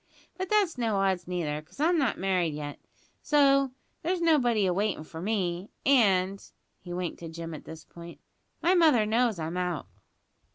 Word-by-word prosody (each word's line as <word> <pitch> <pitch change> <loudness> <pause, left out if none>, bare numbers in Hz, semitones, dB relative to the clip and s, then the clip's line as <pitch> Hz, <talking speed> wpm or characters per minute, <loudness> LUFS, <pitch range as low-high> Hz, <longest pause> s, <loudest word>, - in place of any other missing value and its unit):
But 375 -1 -4
that's 400 -10 +2
no 225 -3 0
odds, 190 -3 0
neither 160 -5 -2
'cause 155 - -21
I'm 330 +3 +3
not 270 -5 +1
married 180 -5 0
yet, 145 -1 -6 0.4
so 275 -2 +4 0.3
there's 360 +2 -1
nobody 250 - +3
awaitin' 190 -1 0
for 160 +1 -9
me 185 -2 -2 0.2
and" 195 -7 +3 0.4
(he 175 - -10
winked 175 0 -4
to 165 - -7
Jim 165 0 -7
at 155 - -9
this 160 0 -10
point) 170 0 -12 0.4
"my 350 +2 +4
mother 310 -11 +5
knows 225 -1 +1
I'm 165 +2 -4
out." 180 -4 -2
195 Hz, 165 wpm, -28 LUFS, 170-275 Hz, 0.4 s, mother